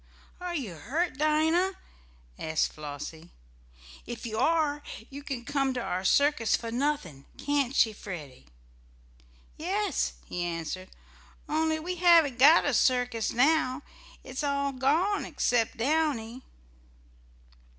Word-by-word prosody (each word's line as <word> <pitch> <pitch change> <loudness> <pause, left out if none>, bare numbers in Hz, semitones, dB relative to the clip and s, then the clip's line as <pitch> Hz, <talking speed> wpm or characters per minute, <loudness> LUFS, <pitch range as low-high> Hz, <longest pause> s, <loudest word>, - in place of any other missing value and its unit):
"Are 355 -1 -4
you 245 - -4
hurt, 285 - -2
Dinah?" 320 +5 +2 0.7
asked 160 0 0
Flossie. 155 +2 -8 0.8
"If 240 0 -6
you 220 -1 -3
are 300 0 +2 0.3
you 280 +1 -7
can 265 -4 -5
come 275 -1 0
to - - -1
our 185 -5 -3
circus 280 +1 +3
for 230 -1 -5
nothing; 240 - -2
can't 280 -2 0
she, 220 -5 +4
Freddie?" 150 - -9 1.1
"Yes," 395 +6 -1
he 175 - -4
answered, 175 +2 -4 0.6
"only 315 +1 +1
we 355 +3 -4
haven't 330 -7 +5
got 300 +6 +7
a 285 - +1
circus 245 -2 +2
now. 280 +1 +2 0.4
It's 260 +3 -5
all 280 -1 0
gone 310 +10 +1
except 230 -2 0
Downy." 260 -3 0
270 Hz, 120 wpm, -28 LUFS, 225-310 Hz, 1.1 s, got